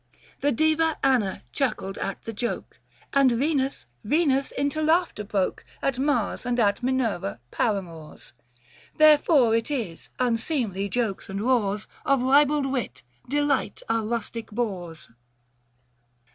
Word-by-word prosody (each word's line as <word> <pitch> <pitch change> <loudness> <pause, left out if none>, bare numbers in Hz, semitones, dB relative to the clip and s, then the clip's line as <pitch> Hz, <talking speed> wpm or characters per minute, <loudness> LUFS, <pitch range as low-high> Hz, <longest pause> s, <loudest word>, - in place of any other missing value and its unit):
The 290 - +2
Diva 315 +4 +2
Anna 245 -8 +1
chuckled 215 -7 -2
at 195 - -4
the 225 - -6
joke; 240 +3 -4 0.3
And 275 -2 +5
Venus 275 +1 0
— 120 - -43
Venus 275 0 +2
into 285 +2 -1
laughter 320 -7 +1
broke 200 -2 -1 0.2
At 270 -2 -1
Mars 265 -6 0
and 245 0 -1
at 205 -1 +2
Minerva 235 - -1
paramours! 170 - -3 0.6
Therefore 300 -6 +5
it 230 +3 0
is, 225 - -4
unseemly 230 - -1
jokes 210 -2 -2
and 195 +1 -4
roars 215 -4 +1 0.2
745 275 -1 +4
Of - - -2
ribald 285 +2 +4
wit, 180 - -3 0.3
delight 285 -6 0
our 225 -1 +1
rustic 230 0 -4
boors. 185 -8 -4
245 Hz, 130 wpm, -25 LUFS, 205-280 Hz, 0.6 s, And